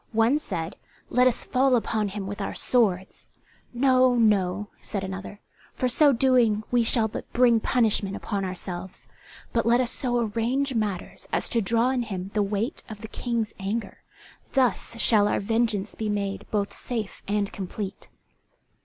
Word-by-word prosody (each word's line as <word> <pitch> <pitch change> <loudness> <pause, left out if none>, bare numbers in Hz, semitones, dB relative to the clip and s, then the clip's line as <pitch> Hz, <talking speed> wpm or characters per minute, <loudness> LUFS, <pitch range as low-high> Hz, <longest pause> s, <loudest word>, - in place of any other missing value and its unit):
One 225 +6 +3
said, 170 - -5 0.3
"Let 250 +1 +5
us 245 - 0
fall 260 0 +3
upon 220 -2 0
him 200 0 -5
with 200 +1 -5
our - - -3
swords." 195 -7 +1 0.4
"No, 255 0 +4
no," 205 -3 +2
said 200 -2 -4
another, 190 +2 -6 0.3
"for 255 - 0
so 285 +4 +5
doing 240 -4 +3
we 245 -1 +4
shall 225 -1 +3
but 220 - -7
bring 240 -2 +5
punishment 215 -4 +1
upon 200 -1 -3
ourselves. 185 0 -6 0.5
But 230 -1 +1
let 240 +1 +5
us 250 -1 +1
so 245 -2 -1
arrange 235 +5 0
matters 210 -6 -3
as - - 0
to 230 - +1
draw 230 +4 +2
on 260 -1 0
him 195 -4 -5
the 210 - +2
weight 210 +6 -1
of 215 -2 -9
the 220 - -6
King's 230 -1 -2
anger; 200 +2 -3 0.5
thus 255 -3 +1
shall 210 -2 +4
our - - +1
vengeance 220 -1 0
be 215 -1 -3
made 200 -1 -2
both 205 -2 -1
safe 225 -5 -5
and 205 0 -1
complete." 195 +1 -6
220 Hz, 160 wpm, -26 LUFS, 200-245 Hz, 0.5 s, Let